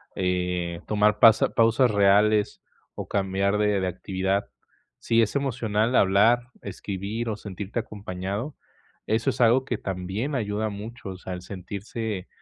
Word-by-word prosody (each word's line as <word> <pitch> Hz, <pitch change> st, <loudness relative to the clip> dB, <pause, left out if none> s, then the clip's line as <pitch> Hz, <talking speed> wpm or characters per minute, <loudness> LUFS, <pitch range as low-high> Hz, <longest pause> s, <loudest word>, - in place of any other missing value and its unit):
eh, 90 Hz, -2 st, -1 dB
tomar 105 Hz, 0 st, +2 dB
pasa 115 Hz, -1 st, +6 dB
pausas 115 Hz, +1 st, +4 dB
reales, 105 Hz, +1 st, +3 dB, 0.3 s
o -, -, -6 dB
cambiar 100 Hz, +1 st, 0 dB
de 105 Hz, -1 st, +2 dB
de 95 Hz, -, -1 dB
actividad. 95 Hz, +2 st, -2 dB, 0.5 s
Sí 115 Hz, 0 st, +2 dB
es 110 Hz, +4 st, 0 dB
emocional 120 Hz, -4 st, 0 dB
hablar, 115 Hz, +6 st, +4 dB
escribir, 100 Hz, +4 st, -4 dB
o 105 Hz, -, -2 dB
sentirte 100 Hz, +3 st, -5 dB
acompañado. 100 Hz, +4 st, -5 dB, 0.5 s
Eso 115 Hz, +4 st, +1 dB
es -, -, -9 dB
algo 120 Hz, +3 st, +5 dB
que 120 Hz, -4 st, -2 dB
también 95 Hz, +10 st, -3 dB
ayuda 105 Hz, -2 st, -1 dB
mucho. 105 Hz, +1 st, -8 dB
O 95 Hz, -, -7 dB
sea, 95 Hz, -, -8 dB
el 90 Hz, -, -6 dB
sentirse 100 Hz, +2 st, -6 dB
105 Hz, 140 wpm, -25 LUFS, 95-115 Hz, 0.5 s, pasa